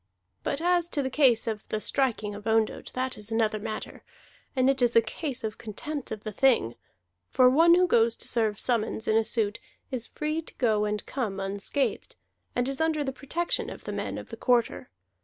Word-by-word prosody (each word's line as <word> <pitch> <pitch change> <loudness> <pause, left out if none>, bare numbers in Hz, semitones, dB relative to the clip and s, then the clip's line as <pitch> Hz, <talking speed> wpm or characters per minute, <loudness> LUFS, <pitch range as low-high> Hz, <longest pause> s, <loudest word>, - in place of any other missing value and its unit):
But 280 - -2
as 350 0 +2
to 285 - +2
the 260 - -2
case 255 -5 +4
of 220 -3 -4
the 215 - -1
striking 220 -4 0
of 205 +2 -8
Ondott, 220 -1 +1
that 255 -1 -2
is 210 +1 -4
another 220 -1 +1
matter; 215 0 -6 0.5
and 255 -1 +3
it 270 -1 +2
is 240 -1 +3
a 230 - +8
case 260 +3 -4
of 215 -1 -4
contempt 280 +6 -5
of 215 -1 -5
the 215 - -4
Thing, 220 - +3 0.6
for 255 - +5
one 330 +6 +6
who 365 +1 +4
goes 230 -8 +3
to - - -5
serve 220 -4 0
summons 225 -2 0
in 215 - +3
a 225 - +4
suit 215 -2 -1 0.3
is 250 -3 -2
free 305 +1 -2
to 325 - -11
go 215 -4 +2
and 210 0 -2
come 220 -8 -3
unscathed, 200 +8 -2 0.4
and 245 +1 +1
is 275 +2 -1
under 315 -2 +1
the 270 -1 -3
protection 325 +6 -2
of - - -9
the - - -5
men - - -3
of - - -9
the - - -7
Quarter. 245 -2 +1
240 Hz, 205 wpm, -27 LUFS, 215-275 Hz, 0.6 s, a